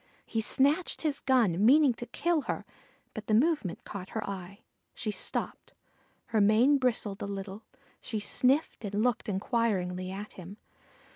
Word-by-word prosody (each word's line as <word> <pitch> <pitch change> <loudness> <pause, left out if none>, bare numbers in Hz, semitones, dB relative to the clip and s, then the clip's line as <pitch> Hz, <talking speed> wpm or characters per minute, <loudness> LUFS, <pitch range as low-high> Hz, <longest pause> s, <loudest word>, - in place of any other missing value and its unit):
He 225 - -2
snatched 285 +11 +1
his 300 -3 +1
gun, 225 -9 +2
meaning 275 +3 +6
to 240 +1 -8
kill 340 +5 0
her, - - -2 0.5
but 220 -1 -7
the 215 - +3
movement 275 - +1
caught 190 -2 -7
her 220 - -3
eye. 195 +1 -7 0.3
She 215 - -2
stopped. - - -2 0.6
Her 220 -2 +2
mane 235 +8 +5
bristled 220 -6 -1
a - - -3
little; 200 +1 -6 0.4
she 220 -3 -4
sniffed 260 +7 +1
and 205 -1 -4
looked 245 -2 0
inquiringly 190 -3 -1
at 200 +3 -7
him. 185 +2 -10
220 Hz, 150 wpm, -29 LUFS, 200-255 Hz, 0.6 s, meaning